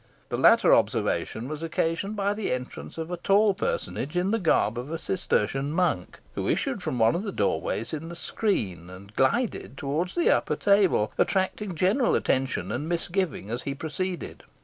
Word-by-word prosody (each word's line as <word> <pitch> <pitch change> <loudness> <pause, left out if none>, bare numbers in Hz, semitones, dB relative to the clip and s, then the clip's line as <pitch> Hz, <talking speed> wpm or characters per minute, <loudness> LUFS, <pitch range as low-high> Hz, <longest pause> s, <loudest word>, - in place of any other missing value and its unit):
The - - -1
latter - - +6
observation 115 +3 +1
was 155 +1 -5
occasioned 165 +4 -1
by 200 0 +1
the 210 -1 -3
entrance 125 +4 -5
of 165 +1 -4
a 180 - -2
tall 200 +3 +4
personage, 175 -5 -3
in 185 +3 +1
the 225 - +1
garb 120 - +2
of 125 +4 -6
a 165 - -2
Cistertian 140 - -1
monk, 160 - 0 0.2
who - - -3
issued - - 0
from 125 - -2
one 115 0 +4
of 175 - -1
the 205 -1 -4
doorways 105 - -1
in 160 +2 -4
the 170 - -7
screen, 105 - -2
and 100 +3 -12
glided 225 - 0
towards 150 +7 -2
the 345 - +3
upper - - -1
table, 200 - +3
attracting 190 0 0
general 200 - +2
attention 130 0 0
and 145 +6 -3
misgiving 175 - -2
as 120 +2 -2
he 140 - -4
proceeded. 170 +5 -4
165 Hz, 175 wpm, -26 LUFS, 130-195 Hz, 0.2 s, latter